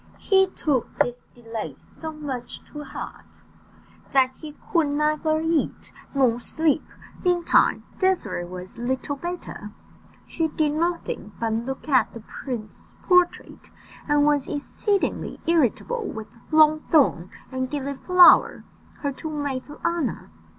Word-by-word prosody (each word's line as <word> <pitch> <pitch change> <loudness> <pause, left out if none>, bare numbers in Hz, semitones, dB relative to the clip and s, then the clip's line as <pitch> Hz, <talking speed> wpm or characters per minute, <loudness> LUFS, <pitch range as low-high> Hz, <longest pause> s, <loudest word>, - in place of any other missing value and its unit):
He 385 -1 +4
took 290 -8 -1
this 245 0 -1
delay 230 -2 -6
so 320 -1 -9
much 280 -6 -6
to 295 0 -6
heart, 270 - -9 0.7
that 260 -1 +4
he 305 -2 -9 0.2
could 330 -4 +4
neither 305 +2 +1
eat 325 -1 -1 0.2
nor 250 -4 +3
sleep; 315 +4 +1 0.4
meantime 355 -2 +3 0.2
Désirée 370 - 0
was 185 +4 -8
little 260 +3 -2
better 345 -9 -6 0.6
she 325 - -1
did 305 -1 0
nothing 335 -9 -2
but 225 -1 0
look 245 +6 -4
at 260 -6 +3
the 230 - -8
prince's 225 -1 -7
portrait, 360 -1 +2 0.4
and 290 0 +4
was 290 -2 +2
exceedingly 390 +7 -1
irritable 335 - +1
with 220 -1 -7 0.2
Longthorn 310 - +4 0.2
and 260 0 -2
Gilliflower, 295 +6 +5 0.4
her 285 - -1
two 315 +4 -6
maids 285 -3 -3
of 295 - -10
honour. 335 - -1
290 Hz, 120 wpm, -24 LUFS, 255-325 Hz, 0.7 s, Gilliflower